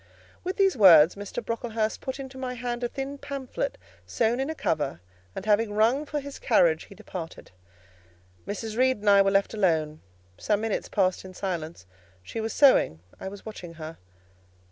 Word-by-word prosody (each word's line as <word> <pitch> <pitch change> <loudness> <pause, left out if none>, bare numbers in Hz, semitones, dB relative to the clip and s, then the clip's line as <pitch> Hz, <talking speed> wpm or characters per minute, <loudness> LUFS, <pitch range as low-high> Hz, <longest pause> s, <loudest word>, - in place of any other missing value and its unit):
'" - - -28
With 370 +2 -3
these 390 -2 +3
words 170 -7 +8
Mr. 200 -1 -6
Brocklehurst 225 -1 -2
put 265 +1 -5
into 265 -1 -8
my 255 -1 -4
hand 240 0 -4
a - - +2
thin 275 +3 -6
pamphlet 280 - -4 0.3
sewn 235 +2 0
in 270 +3 -1
a 320 - -3
cover, 145 - -1 0.4
and 190 - -6
having 210 0 +2
rung 235 +8 +2
for 295 - -2
his 280 0 -8
carriage, 170 -9 +3
he 200 - -14
departed. 185 -5 -8 1.0
Mrs. 215 +1 -4
Reed 260 +1 +3
and 205 0 0
I 200 0 +7
were 195 - +3
left 195 +2 +2
alone: 160 -7 0 0.4
some 210 -1 0
minutes 225 -2 -2
passed 185 -3 +1
in 185 -1 -11
silence; 170 - -4 0.4
she 225 - -5
was 220 0 -3
sewing, 255 - +4 0.2
I - - -6
was 195 +1 -9
watching 180 -6 -8
her. 160 0 -8
215 Hz, 180 wpm, -26 LUFS, 185-260 Hz, 1.0 s, words